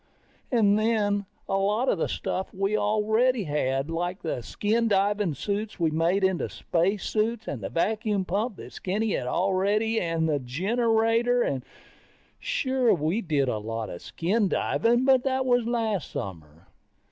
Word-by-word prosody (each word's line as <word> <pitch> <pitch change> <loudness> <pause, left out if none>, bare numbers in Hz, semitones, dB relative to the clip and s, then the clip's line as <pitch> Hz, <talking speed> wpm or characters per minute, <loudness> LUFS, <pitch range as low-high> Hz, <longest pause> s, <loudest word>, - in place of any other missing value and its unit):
And 215 -4 +4
then, 205 -3 +1 0.2
a 195 - 0
lot 210 +6 +1
of 195 - +1
the - - +1
stuff 190 - -3
we 195 +2 0
already 220 +3 +2
had. 145 -2 -1
Like 175 +3 -3
the 155 -6 -2
skin 220 - 0
diving 200 -4 +1
suits 205 +8 -3
we 165 -2 +2
made 170 +5 +1
into 190 -2 +1
spacesuits 215 +5 -1
and 130 - -4
the 95 - -4
vacuum 205 - 0
pump 210 +5 -1
that - - -11
Skinny 210 +3 -1
had 125 - -2
already 200 - +1
and 165 -2 0
the 150 -2 +1
generator. 225 - +1 0.8
Sure, 265 - +1
we 170 +7 -1
did 150 - 0
a 110 -4 -1
lot 115 +1 -4
of 85 - -8
skin 200 +5 0
diving, 240 +6 +1
but 260 -2 +4
that 265 -1 0
was 245 -2 +2
last 225 -7 -1
summer. 80 -3 -7
200 Hz, 150 wpm, -26 LUFS, 165-225 Hz, 0.8 s, And